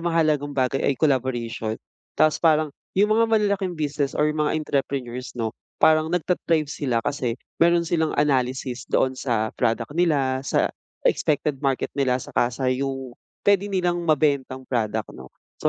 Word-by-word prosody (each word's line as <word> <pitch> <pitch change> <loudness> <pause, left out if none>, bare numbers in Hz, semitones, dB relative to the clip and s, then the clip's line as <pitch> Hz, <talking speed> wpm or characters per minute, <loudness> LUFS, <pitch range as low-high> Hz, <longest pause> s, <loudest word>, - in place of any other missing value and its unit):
mahalagang 155 -4 +1
bagay 130 +1 +1
ay 140 - +2
collaboration. 120 -6 0 0.4
Tapos 155 -1 +3
parang 155 -3 +3 0.2
yung 210 +2 +4
mga 230 +1 +4
malalaking 200 -5 +1
business 145 -2 -2
or 150 - +3
mga 150 0 0
entrepreneurs 135 -4 -3
'no, 110 -1 -2 0.2
parang 155 0 +4
nagta-thrive 165 -3 0
sila 120 -5 -1
kasi 130 -5 -1 0.2
meron 170 0 +4
silang 160 -1 0
analysis 130 -3 0
doon 130 - +2
sa 115 -4 -1
product 115 +5 0
nila, 140 -6 +1
sa 135 - 0 0.3
expected 145 -2 +1
market 135 -2 -1
nila, 130 -3 +1
saka 120 -1 0
sa 130 +2 -5
yung 135 -1 -3 0.3
puwede 200 0 +3
nilang 180 -3 0
mabentang 140 -3 +1
product 110 -4 -2
'no. 65 0 -11 0.3
So - - +3
140 Hz, 145 wpm, -24 LUFS, 130-160 Hz, 0.4 s, yung